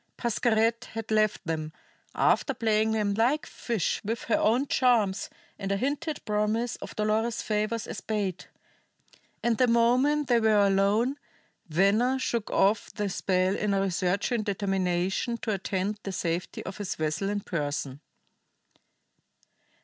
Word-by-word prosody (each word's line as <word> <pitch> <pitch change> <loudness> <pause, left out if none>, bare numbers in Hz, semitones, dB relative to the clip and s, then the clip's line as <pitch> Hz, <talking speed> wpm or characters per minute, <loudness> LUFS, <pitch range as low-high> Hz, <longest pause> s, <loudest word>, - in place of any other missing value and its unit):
Pascherette 230 -1 +1
had 225 -1 -5
left 215 -1 +2
them, 155 -1 -3 0.4
after 275 - +2
playing 220 -1 +2
them 210 -2 +1
like 245 +8 +1
fish 230 -8 -2
with 225 +3 -3
her 225 - +1
own 240 +6 +2
charms 235 -8 +2 0.3
and 195 0 -3
a 200 - +1
hinted 295 +6 -2
promise 215 +3 0
of - - -9
Dolores's 220 +2 0
favors 215 +1 -1
as - - -6
bait; 205 -5 -3 1.0
and 235 -2 +1
the 255 - +5
moment 250 +5 +3
they 240 -2 +4
were 220 -1 +3
alone 200 +7 +2 0.5
Venner 200 +10 +3
shook 235 -4 -2
off 205 +3 +2
the 205 -1 -2
spell 185 0 +1
in 205 -1 0
a 195 - +2
resurging 195 +5 0
determination 195 +1 -1
to 225 - -3
attend 195 +1 -2
to 210 - -46
the 195 - -3
safety 175 -1 -3
of 190 - -6
his 205 -3 -3
vessel 155 +5 -1
in 205 0 -1
person. 145 -5 -3
210 Hz, 140 wpm, -27 LUFS, 195-235 Hz, 1.0 s, the